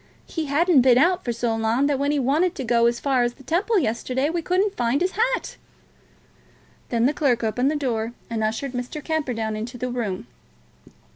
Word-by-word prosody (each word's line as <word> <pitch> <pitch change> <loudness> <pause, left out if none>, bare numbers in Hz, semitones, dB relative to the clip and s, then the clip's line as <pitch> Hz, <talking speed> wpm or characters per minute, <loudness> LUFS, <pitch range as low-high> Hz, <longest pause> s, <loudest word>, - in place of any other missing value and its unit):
He 325 -2 -4
hadn't 310 +1 +4
been 245 -1 +5
out 350 +6 +3
for 240 - -1
so 235 -1 -1
long 225 +4 +1
that 285 -2 +1
when 285 +1 +1
he 295 - +1
wanted 300 +7 +1
to 270 - -4
go 235 -1 +3
as 235 0 0
far 270 -3 +1
as 240 0 0
the 270 - -16
Temple 370 - +1
yesterday, 260 - 0
we 340 0 -1
couldn't 380 +4 0
find 240 +4 +1
his 365 +2 0
hat." 485 +5 -1 1.3
Then 235 -1 +1
the 280 - +3
clerk 250 -7 +1
opened 245 +5 +1
the 310 - -1
door, 235 -5 -2
and 225 -1 -2
ushered 225 +5 -2
Mr. 250 +4 -5
Camperdown 245 -9 -2
into 230 +4 -5
the 250 +1 -3
room. 210 - -3
260 Hz, 200 wpm, -23 LUFS, 235-310 Hz, 1.3 s, been